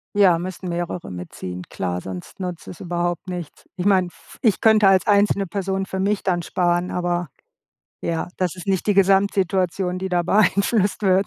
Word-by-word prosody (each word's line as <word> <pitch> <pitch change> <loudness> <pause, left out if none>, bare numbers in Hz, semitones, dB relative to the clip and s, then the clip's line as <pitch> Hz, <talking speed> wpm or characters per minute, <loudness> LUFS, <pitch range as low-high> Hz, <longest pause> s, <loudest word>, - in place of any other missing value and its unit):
Ja, 190 -5 +5
müssen 185 0 -6
mehrere 175 - -4
mitziehen. 90 0 -7
Klar, 90 -1 -3
sonst 90 - -8
nutzt 180 -3 -5
das 175 - -10
überhaupt 175 0 -2
nichts. 175 -4 -7
Ich 180 - -3
meine, 185 -3 +4
f - - -17
ich 220 -5 +3
könnte 220 -2 +5
als 190 -2 +4
einzelne 200 -1 +3
Person 195 +1 -2
für 190 - -4
mich 200 +1 0
dann 175 -2 +1
sparen, 175 +1 0
aber 175 -2 -1 0.7
ja, 165 -1 -2
das 185 -1 -1
ist 180 - -9
nicht 190 0 0
die 205 - +4
Gesamtsituation, 190 -2 +2
die 190 - -2
da 175 -1 +1
beeinflusst 200 +2 +2
wird. 190 0 +3
185 Hz, 175 wpm, -22 LUFS, 175-195 Hz, 0.7 s, Ja